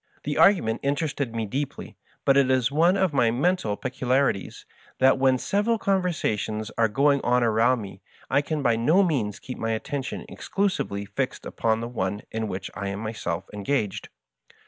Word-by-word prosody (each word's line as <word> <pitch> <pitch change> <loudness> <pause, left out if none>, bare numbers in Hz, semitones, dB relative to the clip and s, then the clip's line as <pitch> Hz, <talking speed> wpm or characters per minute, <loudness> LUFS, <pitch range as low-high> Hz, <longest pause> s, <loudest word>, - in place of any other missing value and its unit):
The 145 0 -2
argument 160 - +4
interested 140 -4 -1
me 115 -1 -1
deeply; 135 +7 -5 0.3
but 135 - +5
it 140 -1 +4
is 130 -1 +2
one 170 +6 +3
of 190 -5 +1
my 120 -4 +3
men 145 +11 +2
tal 105 - -3
peculiarities 130 -4 -1 0.3
that 130 0 +4
when 130 -1 +4
several 210 - 0
conversations 155 - -1
are 115 - +3
going 140 +6 +2
on 125 0 +3
around 115 +2 +3
me 100 - -10 0.3
I 140 - +2
can 150 0 -3
by 115 -3 +3
no 155 +12 +4
means 125 - -1
keep 130 - -8
my 115 0 -1
attention 135 +4 -4
ex - - -10
clusively 185 - -1
fixed - - -3
upon 110 0 0
the 115 - -3
one 100 -4 -3
in 110 0 -2
which 95 -1 -5
I 100 0 -4
am 100 0 -3
myself 110 -6 -4
en 105 - -6
gaged. 105 -4 -1
125 Hz, 180 wpm, -25 LUFS, 110-145 Hz, 0.3 s, but